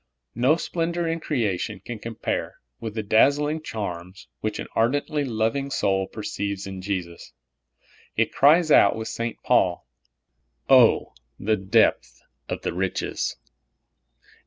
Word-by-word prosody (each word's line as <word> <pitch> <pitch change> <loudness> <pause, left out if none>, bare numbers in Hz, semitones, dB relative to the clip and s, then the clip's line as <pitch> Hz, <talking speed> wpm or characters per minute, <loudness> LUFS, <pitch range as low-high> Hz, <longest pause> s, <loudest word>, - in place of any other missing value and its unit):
No 130 +6 +3
.splendor 170 0 -2
in 165 0 -1
creation 110 - -2
can 110 +4 -7
com 115 +1 -7
pare - - -3 0.2
with 110 -2 -6
the 110 - -2
dazzling 145 +8 +3
charms 95 - -6
which 110 -1 -3
an - - -5
ardently 145 +6 +1
lov 110 -3 0
ing 140 0 -3
soul 95 -7 0
peceives 100 -2 -4
in 95 -1 -7
Jesus. 90 -3 -5 0.8
It - - +1
cries 155 +3 +5
out, 100 - +6
with 110 0 -5
St. 115 0 -4
Paul, - - +2 0.8
"Oh, - - +5 0.3
the 110 +2 +1
depth 95 -1 +1 0.3
of - - -4
the - - -2
riches!" 95 +1 -2
110 Hz, 135 wpm, -24 LUFS, 100-140 Hz, 0.8 s, out